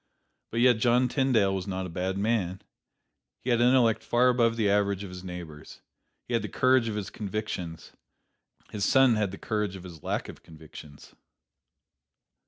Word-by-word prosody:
But 115 - -1
yet 120 -3 +5
John 125 +2 +3
Tyndale 125 -7 +2
was 95 -1 -4
not 95 -1 -3
a - - -6
bad 90 +3 -3
man. 100 -3 -1 0.8
He 125 - -1
had 120 0 +2
intellect 120 -2 +4
far 125 +1 +3
above 115 -2 +2
the 110 -3 +1
average 100 -1 +1
of 95 - -8
his 90 0 -9
neighbors. 85 -5 -9 0.5
He 120 - -5
had 115 - +2
the 105 - -5
courage 130 -2 +3
of 110 - -3
his 105 -2 -5
convictions. 100 -5 -5 0.8
His 105 -2 -4
son 135 +3 +5
had 105 -2 0
the 100 - -8
courage 105 -3 -2
of 95 - -10
his 85 -4 -11
lack - - -3
of - - -11
convictions. 75 -2 -14
105 Hz, 175 wpm, -27 LUFS, 95-120 Hz, 0.8 s, yet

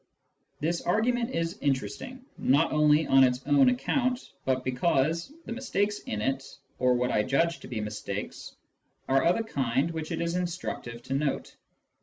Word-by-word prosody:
This 170 +3 -1
argument 235 +5 +1
is 165 -3 -2
interesting, 250 - -2
not 145 +5 +3
only 150 0 +4
on 135 0 +6
its 125 0 +1
own 140 -3 +5
account, 245 - 0
but 130 -1 +1
because 155 - +1
the - - -7
mistakes 210 -4 -1
in 105 0 -4
it 135 +2 0 0.4
(or 125 0 +4
what 125 +1 0
I 105 - +3
judge 165 +9 +1
to - - -11
be 120 -4 -4
mistakes) 105 -1 -5 0.5
are 135 0 +3
of 175 +2 +4
a - - 0
kind 140 - 0
which 160 -1 -5
it 165 - -2
is 170 +1 -1
instructive 165 -9 -4
to 135 - -4
note. 140 0 -1
150 Hz, 165 wpm, -28 LUFS, 130-175 Hz, 0.5 s, on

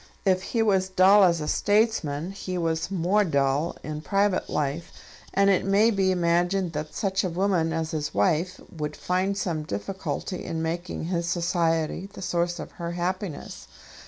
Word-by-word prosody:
If 185 -1 +3
he 225 +4 0
was 190 -3 +2
dull 190 +2 +6
as 170 -3 +3
a 150 - -3
statesman 195 -8 +1
he 185 -2 -5
was 165 -1 -1
more 195 +3 +2
dull 140 -1 0
in 150 0 -5
private 200 +2 +1
life, 150 +3 -2 0.4
and 200 0 +3
it 190 - +2
may 200 +4 +4
be 195 -3 +2
imagined 175 +1 +1
that 150 +1 -5
such 195 -1 0
a 185 - 0
woman 175 -2 +1
as 160 0 -2
his 150 -2 -2
wife 165 - +1 0.2
would 150 -2 -4
find 185 +2 -1
some 170 -5 -1
difficulty 180 - -4
in 165 0 -3
making 170 +2 -3
his 170 0 -2
society 170 0 0
the - - -9
source 175 0 0
of - - -7
her 170 0 -3
happiness. 180 -1 -4
175 Hz, 165 wpm, -26 LUFS, 160-190 Hz, 0.4 s, dull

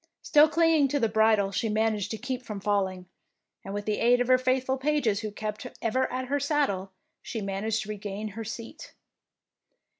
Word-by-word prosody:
Still 300 0 +6
clinging 325 -2 +4
to 285 +2 0
the 230 - +2
bridle, 220 -2 +3
she 220 +3 -1
managed 215 -2 0
to 220 - -4
keep 255 +2 -4
from 210 -5 -6
falling, 190 -2 -1 0.6
and 195 - -7
with 205 +1 -4
the 210 -1 -1
aid 245 +1 +4
of 245 0 0
her 255 0 +6
faithful 260 +1 0
pages 265 -8 +1
who 215 -1 -4
kept 215 +3 -5
ever 255 +3 0
at 255 +1 -3
her 285 +3 0
saddle, 275 -10 0 0.3
she 225 - -5
managed 205 +2 -2
to 215 - -11
regain 210 0 -5
her 225 +3 -6
seat. 225 +1 -8
225 Hz, 185 wpm, -27 LUFS, 205-260 Hz, 0.6 s, Still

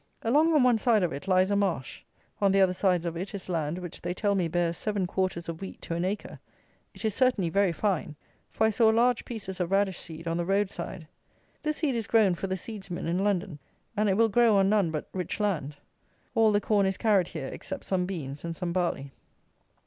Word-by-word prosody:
Along 295 +8 +4
on 290 - +5
one 245 -3 +4
side 220 -3 +3
of 170 - 0
it, 145 +7 -7
lies 185 +1 +3
a - - +3
marsh. 185 -10 -1 0.4
On 200 -1 +4
the 195 - +3
other 190 -1 +4
sides 180 -2 +1
of 170 -1 -3
it 190 +5 -5
is 195 - -7
land 165 -2 -1
which 180 -2 -7
they 180 - -3
tell 205 +1 +1
me 185 -4 +1
bears 170 0 0
seven 205 -1 -1
quarters 180 -1 -2
of 165 +1 -6
wheat 195 - -7
to - - -4
an 170 +1 -1
acre. 195 +3 -4 0.6
It - - -6
is 215 - +1
certainly 230 -9 +2
very 195 -1 +3
fine; 170 -3 -1 0.3
for 220 - +1
I 220 - +3
saw 220 +1 +4
large 235 +2 +3
pieces 195 -6 -6
of 175 -2 -1
radish 195 -1 +1
seed 165 -1 -8
on 165 0 0
the 175 - 0
road 195 +2 +1
side; 170 -4 -7 0.5
this 305 -1 -1
seed 300 -5 0
is 230 -3 -2
grown 215 -5 +4
for 185 +3 -4
the 190 0 -2
seedsmen 195 -3 -6
in 170 +2 0
London; 190 -6 -1 0.4
and 210 0 +2
it 190 - +2
will 230 0 +5
grow 230 0 +4
on 195 -1 +4
none 205 -5 +3
but 155 -2 -4
rich 185 +1 -3
land. 160 -9 -1 0.6
All 220 -1 +4
the 205 - +3
corn 200 -2 +2
is 190 - -1
carried 200 -6 +3
here 135 - -5
except - - -7
some 180 -2 0
beans 145 -7 -5
and 170 -1 -4
some 175 0 -3
barley. 170 -6 -1
190 Hz, 230 wpm, -28 LUFS, 170-210 Hz, 0.6 s, on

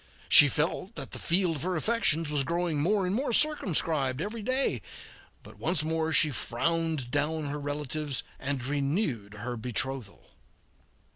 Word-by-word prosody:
She 145 - +10
felt 165 - -1
that - - -7
the - - -7
field 170 -2 +2
of - - -7
her 185 +3 -2
affections 165 -5 0
was 145 -2 +1
growing 170 -1 -1
more 195 +4 +1
and 180 - -1
more 255 +4 -1
circumscribed 165 - +1
every 215 +6 -4
day, 255 +5 +1 0.6
but - - -15
once 160 -2 +1
more 160 0 -1
she 155 -1 +4
frowned 155 +1 -1
down 150 +3 -1
her 145 +1 -4
relatives 145 -1 -3 0.2
and 135 -2 -3
renewed 140 - -2
her 120 +4 -5
betrothal. 125 0 -4
155 Hz, 150 wpm, -28 LUFS, 140-175 Hz, 0.6 s, She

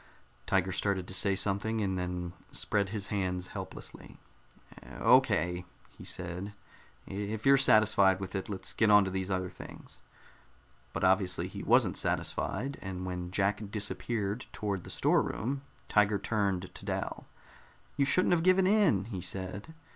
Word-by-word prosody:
Tiger 95 -1 +2
started 95 -1 -1
to - - -4
say 95 +1 +3
something, 100 +3 0
and 95 -3 0
then 90 -1 -3 0.2
spread 100 -2 -1
his 100 -1 -4
hands 90 -3 -2
helplessly. - - -8 0.8
"Okay," 90 +2 +3 0.3
he - - -12
said. 90 +3 -4 0.5
"If 105 +3 -4
you're 135 0 +7
satisfied 110 -7 +5
with 95 -2 -6
it, 95 0 -4
let's 100 -2 -5
get 110 - +3
on 105 -1 +7
to 95 - -3
these 95 0 -3
other 95 -2 -1
things." - - -12 0.9
But - - -4
obviously 95 -1 +2
he - - -7
wasn't - - +3
satisfied, 135 +8 -2
and 95 -1 -5
when 90 -1 -4
Jack 100 +2 0
disappeared 105 +2 -2
toward 100 -4 -3
the - - -9
storeroom, 135 +5 0 0.3
Tiger 105 0 +3
turned 100 -3 -1
to - - -9
Dal. - - -4 0.7
"You 140 - +2
shouldn't 180 +7 +2
have 170 - +3
given 185 +2 +4
in," 190 - +3
he 100 -5 -5
said. 95 - -4
100 Hz, 145 wpm, -31 LUFS, 95-110 Hz, 0.9 s, you're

